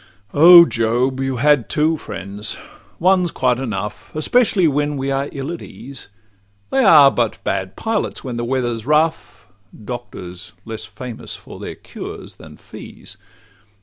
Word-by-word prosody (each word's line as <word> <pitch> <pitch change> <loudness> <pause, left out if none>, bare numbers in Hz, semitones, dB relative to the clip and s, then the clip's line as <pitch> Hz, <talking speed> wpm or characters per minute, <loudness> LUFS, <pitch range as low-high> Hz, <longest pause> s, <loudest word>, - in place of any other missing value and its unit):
O 170 +3 +9
job! 120 +1 0
you 135 -1 -1
had 145 -1 +3
two 155 +2 +1
friends: 105 -6 -6 0.4
one 185 +1 +3
's - - -2
quite 125 -4 0
enough, 105 -4 -5
Especially 190 +2 +2
when 145 0 0
we 135 +1 -2
are 135 +1 -1
ill 140 +2 -5
at 170 - -6
ease; 135 -1 -11 0.6
They 270 - +2
are 150 - +8
but 120 -4 -1
bad 95 0 -3
pilots 225 -2 -2
when 125 -3 -5
the 120 - -3
weather 120 -1 -1
's 115 +2 -9
rough, 150 -8 0 0.4
Doctors 90 -8 -8
less 110 -1 -6
famous 110 +3 -8
for - - -12
their - - -7
cures - - -10
than - - -14
fees. - - -12
135 Hz, 150 wpm, -19 LUFS, 115-155 Hz, 0.6 s, O